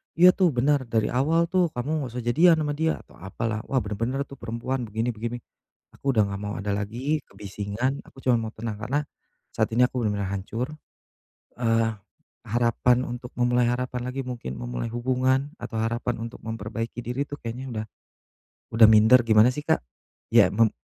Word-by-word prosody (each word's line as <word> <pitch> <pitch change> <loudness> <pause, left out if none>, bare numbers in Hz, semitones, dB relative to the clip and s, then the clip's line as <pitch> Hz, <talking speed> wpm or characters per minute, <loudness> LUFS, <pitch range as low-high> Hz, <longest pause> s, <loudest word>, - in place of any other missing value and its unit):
"Iya 180 +2 +8
tuh 185 -1 +3
benar 130 +1 +2
dari 110 -1 0
awal 155 +7 +2
tuh 185 -2 +3
kamu 125 +3 -3
nggak 130 -4 -4
usah 125 - -3
jadian 160 +7 +4
ama 150 - -1
dia," 160 +2 0
atau - - -20
apalah, 110 +4 -3
"wah - - -3
benar-benar 115 +7 -2
tuh 140 -1 -13
perempuan 115 +2 -3
begini 110 +3 -1
begini." 120 +2 -5 0.5
aku 135 -1 -2
udah 110 - +5
gak 100 -1 -2
mau 105 0 -4
ada 100 +2 -3
lagi 115 +10 -1
kebisingan, 105 +6 -3
aku 135 - -15
cuma 125 -2 +3
mau 110 -1 -4
tenang 110 -2 -5
karena 130 +6 -1 0.5
saat 115 - -1
ini 125 - +4
aku 125 -2 +1
benar-benar 100 -2 -1
hancur, 115 +7 -4 0.9
eee, 115 -1 +2 0.6
harapan 120 +2 +2
untuk 125 0 -6
memulai 125 0 +2
harapan 125 0 -1
lagi 135 +2 -3
mungkin 120 - -5
memulai - - -4
hubungan, 130 +3 +1
atau 115 - -7
harapan 120 +1 -2
untuk 115 +1 -7
memperbaiki 115 +1 -5
diri 125 +4 -2
tuh 145 - -7
kayaknya 120 +3 -5
udah 110 - -3 0.9
udah 115 - +10
minder 115 +3 +6
gimana 110 +1 +6
sih 145 +3 -4
Kak? - - +2 0.5
Ya - - +5
mem 115 +2 +4
120 Hz, 175 wpm, -25 LUFS, 110-130 Hz, 0.9 s, udah